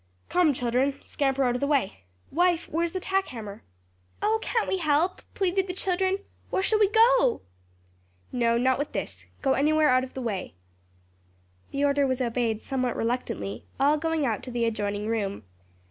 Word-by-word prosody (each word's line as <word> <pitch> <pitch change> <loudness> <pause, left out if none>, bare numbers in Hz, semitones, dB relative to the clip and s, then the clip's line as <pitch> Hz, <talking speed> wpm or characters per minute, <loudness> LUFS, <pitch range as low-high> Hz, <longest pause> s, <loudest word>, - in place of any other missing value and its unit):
Come, 355 -4 +4
children, 255 +3 0
scamper 275 -2 0
out 245 -2 +2
of 245 - -3
the 280 - +1
way! 195 - 0 0.3
Wife; 350 +1 +2
where's 335 +1 0
the 375 - -1
tack 385 +1 0
hammer?" 215 -3 -8 0.6
"Oh, 440 +1 +1
can't 460 -1 0
we 380 - 0
help?" 325 +3 +1
pleaded 385 0 +1
the 365 - -4
children, 375 0 +1 0.3
"Where 380 - 0
shall 430 +1 +3
we 415 -2 +4
go?" 485 +3 +4 0.9
"No, 235 -2 +2
not 260 +2 +2
with 290 - -3
this. - - -5 0.2
Go 270 -2 +3
anywhere 305 +2 +3
out 255 0 +4
of 260 - -9
the - - -4
way." 205 - -4 1.1
The 280 +1 0
order 280 -1 +2
was 260 -1 -1
obeyed 235 -3 -1
somewhat 255 -3 -1
reluctantly, 115 - -3 0.2
all 290 +3 +4
going 325 -1 0
out 225 -5 -1
to - - -8
the 240 -1 0
adjoining 205 -2 -2
room. 210 - -2
275 Hz, 175 wpm, -26 LUFS, 235-355 Hz, 1.1 s, Come